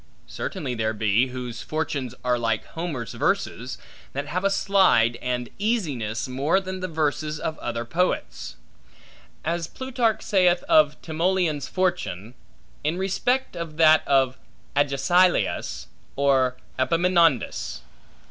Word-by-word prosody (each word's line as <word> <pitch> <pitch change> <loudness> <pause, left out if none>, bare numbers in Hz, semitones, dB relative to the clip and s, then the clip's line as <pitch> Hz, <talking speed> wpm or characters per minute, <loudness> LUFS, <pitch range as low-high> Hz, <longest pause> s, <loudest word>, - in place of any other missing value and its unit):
Certainly 125 - -4
there 110 -1 -1
be, 110 +4 +2
whose 125 -2 -6
fortunes 145 -5 -3
are 125 -1 +1
like 115 -2 -1
Homer's 160 -8 -5
verses, - - -1 0.4
that 140 +1 -3
have 180 +6 -3
a 200 - +3
slide 190 - +3
and 125 -1 -2
easiness 145 - -1
more 140 +8 +1
than 185 -1 -6
the 185 - -3
verses 155 -1 -1
of 160 - -3
other 115 0 -3
poets; 180 +9 -2 0.9
as 165 0 -1
Plutarch 240 -4 -1
saith 180 -3 +3
of 150 -1 +4
Timoleon's 165 -3 0
fortune, 150 - -2 0.5
in 155 +4 0
respect 220 +7 0
of 165 -2 -6
that 155 -1 +6
of 135 -2 +2 0.4
Agesilaus 160 +6 +2 0.3
or 135 -2 +2 0.2
Epaminondas. 165 -1 +2
155 Hz, 120 wpm, -24 LUFS, 125-180 Hz, 0.9 s, that